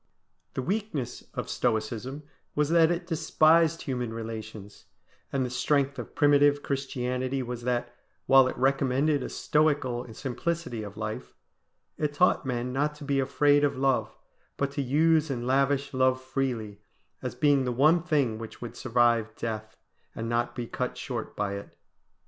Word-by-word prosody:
The 130 - -2
weakness 170 - -3
of - - -3
Stoicism 120 +4 -2 0.3
was 150 0 +1
that 165 -1 +5
it 175 0 -1
despised 165 0 +3
human 125 -4 -3
relations; 110 -2 -7 0.5
and 135 -2 0
the - - -3
strength 140 +2 +1
of - - -8
primitive 145 -1 +4
Christianity 130 -1 -2
was 120 -1 -5
that, 120 -1 -1 0.3
while 135 -1 +6
it - - -4
recommended 135 +2 +2
a - - -4
Stoical 140 -6 0
simplicity 140 0 -3
of 105 0 -8
life, 110 - -5 0.6
it 150 -1 -1
taught 180 -3 +3
men 125 0 -2
not 150 +3 0
to 150 - -11
be 140 -1 0
afraid 145 +2 +3
of 145 - +1
love, 135 -1 0 0.4
but 140 0 -1
to 140 - -2
use 155 +4 +3
and 120 -3 -3
lavish 140 +2 +1
love 130 0 +3
freely, 125 -6 -3 0.4
as - - -4
being 145 -3 +3
the 125 - 0
one 155 +7 +4
thing 145 -10 0
which 115 -1 -9
would 120 - -7
survive 120 -3 +2
death 110 -1 -5 0.4
and 115 - -4
not 120 +1 -1
be 120 -1 -3
cut - - -4
short - - -5
by 100 -1 -1
it. 100 0 -8
130 Hz, 155 wpm, -28 LUFS, 120-145 Hz, 0.6 s, while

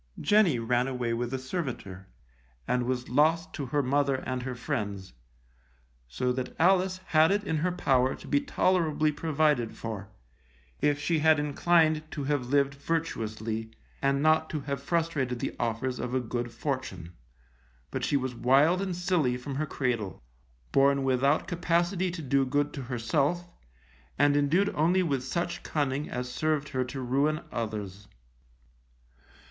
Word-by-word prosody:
Jenny 205 - +4
ran 120 +2 +1
away 125 -3 -2
with 120 +1 -2
a 135 - -1
servitor, 130 - -5 0.6
and 125 -1 0
was 125 -1 -2
lost 160 +6 +2
to 140 - -4
her 145 +3 +1
mother 140 +1 +2
and 130 0 -3
her 125 0 -4
friends; 105 - -4 0.9
so 125 - -1
that 125 0 -4
Alice 185 +1 +3
had 160 -1 +4
it 205 +1 +1
in 160 -5 -1
her 180 +4 0
power 130 -6 +2
to - - -13
be 285 - +2
tolerably 170 - +1
provided 150 -6 +1
for, 105 -3 -6 0.7
if 145 -1 +2
she 160 +2 +1
had 155 0 +5
inclined 155 +1 +3
to 145 - -3
have 140 -3 -1
lived 140 +1 +2
virtuously, 115 -8 -3 0.3
and 140 +1 +1
not 155 0 +3
to 155 - -3
have 140 0 -4
frustrated 150 -5 -1
the - - -4
offers 120 +2 -1
of 125 +1 -3
a - - +3
good 120 0 -3
fortune. 115 - -4 0.8
But - - -3
she 145 - +2
was 130 -2 -3
wild 140 +9 +3
and 190 -3 -2
silly 175 -8 +1
from 135 +3 -6
her 155 +1 -1
cradle, 120 -9 -2 0.5
born 140 0 +4
without 135 +3 +2
capacity 175 +1 0
to 170 -2 -6
do 135 0 +2
good 145 +2 0
to 140 - -5
herself, 135 +8 -1 0.7
and 145 +1 +4
indued 165 +8 +2
only 175 +5 +3
with 140 -6 -1
such 175 +5 -2
cunning 145 -1 -2
as 125 0 -3
served 150 +2 -1
her 130 -3 0
to 130 +2 -6
ruin 140 +5 +1
others. 105 -3 -5
140 Hz, 155 wpm, -28 LUFS, 125-160 Hz, 0.9 s, had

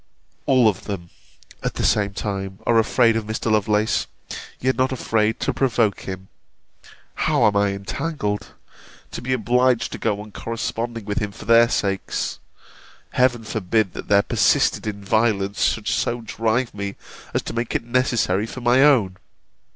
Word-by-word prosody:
All 130 -4 +5
of 100 -3 -1
them, 90 -5 -6 0.5
at - - -3
the - - -2
same 100 -1 +2
time, 95 -2 -4
are 115 -1 +4
afraid 115 +1 +3
of 110 -2 -2
Mr. 110 +1 -2
Lovelace; 105 0 +1 0.5
yet 130 +1 +1
not 130 +1 +1
afraid 110 -3 0
to 140 - 0
provoke 115 -6 +1
him! 95 0 -7 0.9
How - - +2
am 105 -1 +3
I 100 0 +3
entangled! 105 +2 -3 0.6
to - - -6
be 130 +2 -3
obliged 125 0 +2
to - - -6
go 105 -2 0
on 105 0 -11
corresponding 115 0 -4
with 105 +3 -1
him 105 -3 -3
for - - -12
their 115 0 +6
sakes 100 -5 -2 0.7
Heaven 125 -2 +2
forbid, 110 -2 0
that - - -7
their 100 0 +4
persisted - - +2
in 100 -1 -5
violence 100 -2 +1
should 110 -2 -1
so 120 0 0
drive 115 +2 -1
me, 100 -1 -5 0.4
as - - +1
to - - -5
make 115 0 -3
it - - 0
necessary 115 -5 +1
for 125 - -8
my 120 +2 +4
own! 115 -11 +4
110 Hz, 160 wpm, -22 LUFS, 100-120 Hz, 0.9 s, their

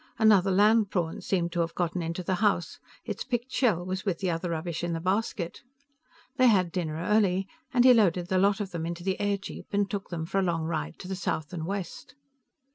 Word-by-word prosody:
Another 210 -4 +5
land 210 +2 +4
prawn 170 -4 -2
seemed 175 -3 -1
to 175 - -2
have 165 0 -1
gotten 175 0 -1
into 170 +2 -3
the 185 - -1
house; 200 -6 +1 0.3
its 215 -2 -4
picked 245 0 -3
shell 200 -10 +1
was 185 +1 -3
with 190 -5 -1
the 185 -1 -1
other 165 +2 -2
rubbish 165 0 -3
in 175 -1 -1
the 165 - -2
basket. 185 -1 -2 0.8
They 255 - +5
had 185 -6 +3
dinner 165 -4 -2
early, 190 +2 +1 0.2
and 245 -1 +4
he 255 - +9
loaded 180 -6 +3
the 190 -1 +1
lot 200 +2 +3
of 200 -2 -4
them 165 -2 -3
into 170 0 -5
the 190 0 -1
airjeep 200 -1 -3
and 200 0 +1
took 200 -1 -5
them 165 -2 -4
for 195 +4 -1
a - - +2
long 170 -3 0
ride 80 - -3
to - - -8
the 190 - -3
south 180 -3 -3
and 165 -2 -4
west. 200 +5 -5
185 Hz, 220 wpm, -28 LUFS, 170-205 Hz, 0.8 s, he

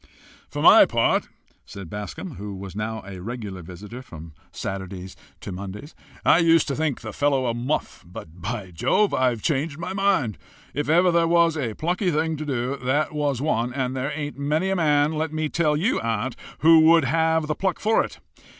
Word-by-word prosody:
"For - - -4
my - - +8
part," - - +1 0.3
said 100 -3 -9
Bascombe, 105 - -7
who 100 0 -6
was 95 0 -8
now 110 +1 -4
a 95 -2 -8
regular 105 -3 -6
visitor 100 +8 -9
from 80 -9 -11 0.2
Saturdays 95 -1 -6 0.3
to - - -6
Mondays, 100 - -7 0.3
"I 165 - +6
used 165 -2 +4
to 140 - -1
think 155 -3 -1
the 110 -3 -7
fellow 140 -2 +1
a 120 - 0
muff, 125 +6 -3
but, 85 0 -11
by 100 -1 -4
Jove! 195 - +1
I've 125 -4 +1
changed 150 0 -1
my 180 +3 -5
mind. 190 - +1 0.3
If 145 +1 -2
ever 175 +3 +5
there 170 -1 +3
was 170 -1 +3
a 120 -8 -3
plucky 180 +4 0
thing 160 0 0
to 155 - -5
do, 130 0 -2
that 140 +5 0
was 145 -3 -1
one, 120 -5 0
and 130 -1 -1
there 130 +3 -2
ain't 145 -1 -5
many 155 +7 0
men, 150 -4 +2
let 155 0 -2
me 155 -1 -2
tell 155 -2 +1
you, 200 +11 +1
aunt, 115 +2 -2 0.3
who 165 +1 +7
would 160 -1 +6
have 160 +2 +2
the 155 - -1
pluck 185 +2 -1
for 220 +1 +3
it. - - -8
140 Hz, 190 wpm, -24 LUFS, 110-160 Hz, 0.3 s, my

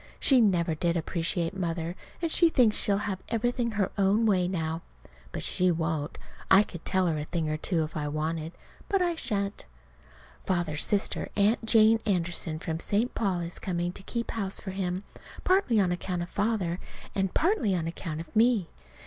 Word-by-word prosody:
She 260 -3 +6
never 175 -6 +2
did 170 +2 0
appreciate 170 +2 -1
Mother, 170 -2 -2 0.3
and 330 - +1
she 340 0 +6
thinks 245 -8 +4
she'll 200 -1 +2
have 190 -3 -3
everything 235 0 0
her 200 -2 0
own 200 +4 +3
way 185 -4 +3
now. 165 -2 -2 0.5
But - - -5
she 185 0 +1
won't. 160 -2 -1 0.3
I 190 +2 +7
could 175 -5 -10
tell 190 -1 +2
her 160 -3 0
a 150 - -4
thing 165 -1 -2
or 155 - 0
two 165 0 0
if 155 - -7
I 150 -1 -2
wanted 155 +2 -3
to. - - -27 0.3
But 390 -2 +2
I 350 -1 +1
shan't. 200 - -3 0.8
Father's 175 -5 0
sister, 205 -1 0
Aunt 210 +4 +2
Jane 220 0 +5
Anderson, 175 -4 0
from 160 0 -4
St. 215 +8 0
Paul, 190 -5 0
is 170 +1 -6
coming 175 -1 -2
to - - -8
keep 235 +4 -4
house 195 -4 -1
for 190 - -6
him, 185 0 -2 0.4
partly 365 - +3
on 185 -3 +2
account 175 0 -2
of 175 - -9
Father, 200 -5 0 0.3
and 195 -2 -1
partly 310 - +2
on 165 -2 -1
account 165 -1 -5
of 170 - -13
me. 225 -5 +3
185 Hz, 185 wpm, -28 LUFS, 170-215 Hz, 0.8 s, I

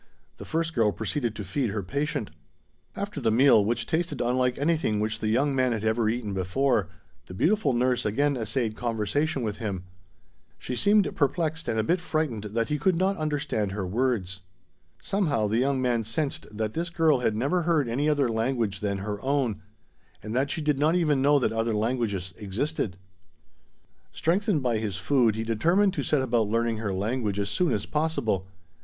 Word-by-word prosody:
The - - -9
first 165 0 -1
girl 115 -6 +3
proceeded 115 +2 -2
to 105 - -5
feed 115 +6 -1
her 100 0 -3
patient. 140 - -2 0.6
After 200 -7 -4
the 115 - +2
meal, 115 -1 +5
which 115 +4 -1
tasted 160 -3 -1
unlike 125 +1 +1
anything 145 -8 +1
which 110 +1 -1
the 110 - -2
young 135 +6 +2
man 130 -2 +2
had 110 -2 -3
ever 110 0 +1
eaten 110 -3 -2
before, 95 +3 +1 0.4
the 90 - -9
beautiful 205 - +2
nurse 125 0 +1
again 140 +7 +1
essayed 110 -1 -1
conversation 120 +5 -1
with 105 -2 -3
him. 100 -6 -4 0.7
She 125 - -5
seemed 205 - +3
perplexed 160 +2 0
and 110 - 0
a - - +2
bit 175 +9 +1
frightened 155 - -2
that 115 +2 -2
he 150 - 0
could 185 +5 +2
not 190 +3 +1
understand 140 -10 -1
her 100 -2 -3
words. 100 -3 -1 0.6
Somehow, 150 - 0
the 110 +3 +1
young 135 +1 +1
man 120 -3 +1
sensed 135 +7 -3
that 110 0 -3
this 170 +1 -2
girl 160 -5 +3
had 115 -3 0
never 140 +11 +1
heard 160 -5 +1
any 140 +6 0
other 145 -3 +2
language 115 -3 -1
than 100 -1 -1
her 100 +1 -4
own, 130 -6 0 0.6
and 110 +2 -5
that 135 +2 +1
she 160 - -2
did 150 -2 +1
not 155 +4 +3
even 150 -6 +2
know 145 +2 +5
that 135 - +1
other 115 0 0
languages 105 -5 -1
existed. 105 - -2 1.1
Strengthened 180 - +1
by 120 -3 +1
his 105 -4 -3
food, 120 -1 +2
he 110 - -2
determined 170 - +2
to - - -2
set 145 -3 +1
about 115 -4 +1
learning 115 0 0
her 110 -2 -2
language 105 +2 -1
as 100 0 -1
soon 180 - +1
as 105 - -1
possible. 140 - -1
120 Hz, 185 wpm, -26 LUFS, 110-150 Hz, 1.1 s, meal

